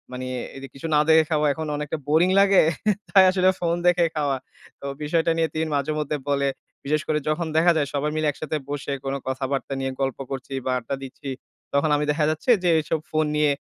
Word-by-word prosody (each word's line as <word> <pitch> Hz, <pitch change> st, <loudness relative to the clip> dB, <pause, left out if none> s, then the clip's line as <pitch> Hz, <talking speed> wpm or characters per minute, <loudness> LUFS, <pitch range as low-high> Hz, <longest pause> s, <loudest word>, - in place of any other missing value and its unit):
মানে 130 Hz, 0 st, -5 dB, 0.3 s
এইযে 135 Hz, 0 st, -8 dB
কিছু 135 Hz, +4 st, -5 dB
না 150 Hz, -, +5 dB
দেখে 160 Hz, 0 st, +7 dB
খাওয়া 150 Hz, -1 st, +2 dB
এখন 160 Hz, +2 st, -5 dB
অনেকটা 150 Hz, +2 st, -3 dB
বোরিং 160 Hz, +5 st, +4 dB
লাগে। 200 Hz, -1 st, +6 dB, 0.5 s
তাই 190 Hz, -1 st, +7 dB
আসলে 185 Hz, 0 st, +3 dB
ফোন 170 Hz, -1 st, +1 dB
দেখে 175 Hz, -1 st, +4 dB
খাওয়া।" 145 Hz, -3 st, 0 dB, 0.4 s
তো -, -, -8 dB, 0.2 s
বিষয়টা 165 Hz, +2 st, +1 dB
নিয়ে 165 Hz, -1 st, +2 dB
তিনি 160 Hz, 0 st, -1 dB
মাঝেমধ্যে 150 Hz, +1 st, -1 dB
বলে। 140 Hz, -1 st, +1 dB, 0.4 s
বিশেষ 150 Hz, +1 st, +1 dB
করে 155 Hz, -1 st, +1 dB
যখন 160 Hz, +2 st, -1 dB
দেখা 170 Hz, +2 st, +5 dB
যায় 145 Hz, -2 st, +1 dB
সবাই 145 Hz, +1 st, -1 dB
মিলে 155 Hz, 0 st, +1 dB
একসাথে 155 Hz, +1 st, -4 dB
বসে 145 Hz, 0 st, -4 dB
কোন 135 Hz, -, -1 dB
কথাবার্তা 135 Hz, +1 st, -2 dB
নিয়ে 135 Hz, 0 st, -2 dB
গল্প 135 Hz, -2 st, -1 dB
করছি 135 Hz, 0 st, -5 dB
বা 130 Hz, -, 0 dB
আড্ডা 120 Hz, +3 st, -4 dB
দিচ্ছি। 135 Hz, +1 st, -8 dB, 0.4 s
তখন 140 Hz, +2 st, +2 dB
আমি 150 Hz, -, -1 dB
দেখা 150 Hz, 0 st, +1 dB
যাচ্ছে 155 Hz, -, 0 dB
যে 175 Hz, -, +3 dB
এইসব 155 Hz, +1 st, -1 dB
ফোন 155 Hz, 0 st, +2 dB
নিয়ে, 150 Hz, -1 st, +3 dB
150 Hz, 200 wpm, -24 LUFS, 140-160 Hz, 0.5 s, দেখে